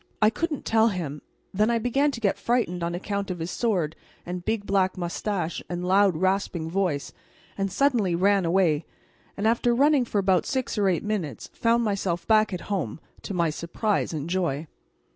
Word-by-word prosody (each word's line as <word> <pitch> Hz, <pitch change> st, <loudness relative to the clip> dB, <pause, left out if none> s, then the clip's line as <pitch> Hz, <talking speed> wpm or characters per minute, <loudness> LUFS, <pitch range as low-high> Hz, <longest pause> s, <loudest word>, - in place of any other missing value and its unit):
I 215 Hz, 0 st, +5 dB
couldn't 320 Hz, +2 st, -3 dB
tell 225 Hz, 0 st, +4 dB
him; 165 Hz, -8 st, -3 dB, 0.3 s
then 210 Hz, +3 st, +2 dB
I 235 Hz, -, +2 dB
began 245 Hz, +6 st, +2 dB
to 265 Hz, -, -5 dB
get 205 Hz, -4 st, 0 dB
frightened 230 Hz, -8 st, 0 dB
on 170 Hz, 0 st, -1 dB
account 200 Hz, +2 st, -3 dB
of 180 Hz, -, -3 dB
his 165 Hz, +1 st, -4 dB
sword 180 Hz, -10 st, 0 dB, 0.3 s
and 180 Hz, 0 st, -5 dB
big 220 Hz, 0 st, -1 dB
black 190 Hz, -2 st, +1 dB
moustache 175 Hz, 0 st, -2 dB
and 175 Hz, 0 st, -3 dB
loud 190 Hz, -2 st, +4 dB
rasping 185 Hz, -3 st, 0 dB
voice, 180 Hz, -7 st, -1 dB, 0.4 s
and 195 Hz, -1 st, -2 dB
suddenly 225 Hz, -6 st, +2 dB
ran 195 Hz, +2 st, +3 dB
away, 170 Hz, -3 st, +2 dB, 0.5 s
and 205 Hz, +2 st, +1 dB
after 235 Hz, +1 st, +2 dB
running 280 Hz, 0 st, +4 dB
for 215 Hz, -, -3 dB
about 190 Hz, -2 st, +2 dB
six 260 Hz, -2 st, -1 dB
or 205 Hz, -3 st, +2 dB
eight 175 Hz, -, 0 dB
minutes 195 Hz, -, -3 dB
found 235 Hz, 0 st, +2 dB
myself 195 Hz, -5 st, -1 dB
back 215 Hz, -1 st, +4 dB
at 180 Hz, -2 st, -4 dB
home, 175 Hz, -, -3 dB, 0.2 s
to 195 Hz, -, -5 dB
my 170 Hz, -3 st, +2 dB
surprise 185 Hz, +7 st, -1 dB
and 155 Hz, -2 st, -4 dB
joy. 170 Hz, -5 st, -1 dB
195 Hz, 180 wpm, -26 LUFS, 175-220 Hz, 0.5 s, I